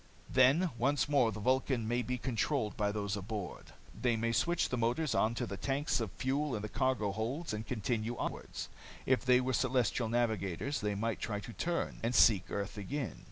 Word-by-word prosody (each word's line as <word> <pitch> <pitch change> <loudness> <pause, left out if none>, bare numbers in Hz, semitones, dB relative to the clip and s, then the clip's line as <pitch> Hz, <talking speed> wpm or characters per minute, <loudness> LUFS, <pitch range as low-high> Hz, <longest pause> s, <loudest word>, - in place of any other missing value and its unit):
Then 140 +7 +5
once 140 +4 +2
more 140 -6 +3
the 105 - -6
Vulcan 130 0 +1
may 120 +2 +1
be 125 +1 -2
controlled 125 -1 -1
by 105 -1 0
those 100 -1 -2
aboard. 100 -1 -5 0.3
They 120 -2 +1
may 115 +1 0
switch 170 +10 +1
the - - -1
motors 120 +6 +1
onto 115 +2 +1
the 100 +1 -5
tanks 135 +5 0
of 110 -5 -3
fuel 135 +1 -1
in 105 - -4
the 105 - -4
cargo 130 -6 +1
holds, 120 - -3
and 105 0 -4
continue 115 +1 -2
onwards. - - -4 0.4
If 130 -1 +2
they 125 -1 +5
were 130 +1 -1
celestial 125 -2 +1
navigators, 115 - -1
they 105 -1 -1
might 115 +2 -1
try 105 -2 -2
to 115 - -9
turn, 170 - -2
and 115 +2 0
seek 100 -5 +5
earth 100 +1 -3
again. 135 +5 -4
120 Hz, 190 wpm, -33 LUFS, 105-130 Hz, 0.4 s, Then